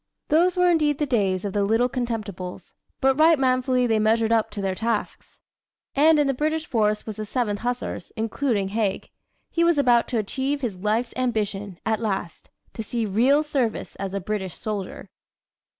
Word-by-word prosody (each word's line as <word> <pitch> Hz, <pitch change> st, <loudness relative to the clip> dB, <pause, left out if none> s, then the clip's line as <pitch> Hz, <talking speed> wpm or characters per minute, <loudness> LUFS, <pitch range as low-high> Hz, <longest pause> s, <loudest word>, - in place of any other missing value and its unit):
Those 350 Hz, +4 st, +3 dB
were 360 Hz, 0 st, +4 dB
indeed 300 Hz, -4 st, +2 dB
the 295 Hz, -, 0 dB
days 200 Hz, -7 st, 0 dB
of 200 Hz, -, -3 dB
the 205 Hz, -, +1 dB
"Little 225 Hz, +4 st, +2 dB
Contemptibles," 220 Hz, -8 st, -5 dB, 0.3 s
but 270 Hz, +1 st, +3 dB
right 320 Hz, +1 st, +6 dB
manfully 255 Hz, -1 st, +2 dB
they 225 Hz, -2 st, +2 dB
measured 220 Hz, +1 st, +2 dB
up 225 Hz, -1 st, +2 dB
to 210 Hz, -1 st, -7 dB
their 195 Hz, -1 st, -1 dB
tasks. 220 Hz, +2 st, -3 dB, 0.6 s
And 310 Hz, +3 st, +5 dB
in 295 Hz, -, +3 dB
the 275 Hz, -, +1 dB
British 310 Hz, +4 st, -1 dB
force 210 Hz, -2 st, 0 dB
was 215 Hz, -2 st, -6 dB
the 215 Hz, -, -3 dB
Seventh 210 Hz, -2 st, -1 dB
Hussars, 245 Hz, +1 st, -4 dB
including 225 Hz, -2 st, -1 dB
Haig. 205 Hz, -2 st, -2 dB, 0.4 s
He 335 Hz, -, +1 dB
was 340 Hz, -2 st, +3 dB
about 245 Hz, -4 st, +4 dB
to 240 Hz, -, -2 dB
achieve 265 Hz, +7 st, -2 dB
his 240 Hz, -6 st, -2 dB
life's 215 Hz, +6 st, -1 dB
ambition, 210 Hz, -6 st, -2 dB
at 220 Hz, -1 st, +1 dB
last 195 Hz, -6 st, -4 dB, 0.2 s
to -, -, -5 dB
see 230 Hz, +1 st, -2 dB
real 250 Hz, +9 st, +3 dB
service 265 Hz, -7 st, -2 dB
as 195 Hz, 0 st, -4 dB
a -, -, 0 dB
British 190 Hz, -2 st, -4 dB
soldier. 210 Hz, -4 st, -5 dB
230 Hz, 180 wpm, -24 LUFS, 210-270 Hz, 0.6 s, right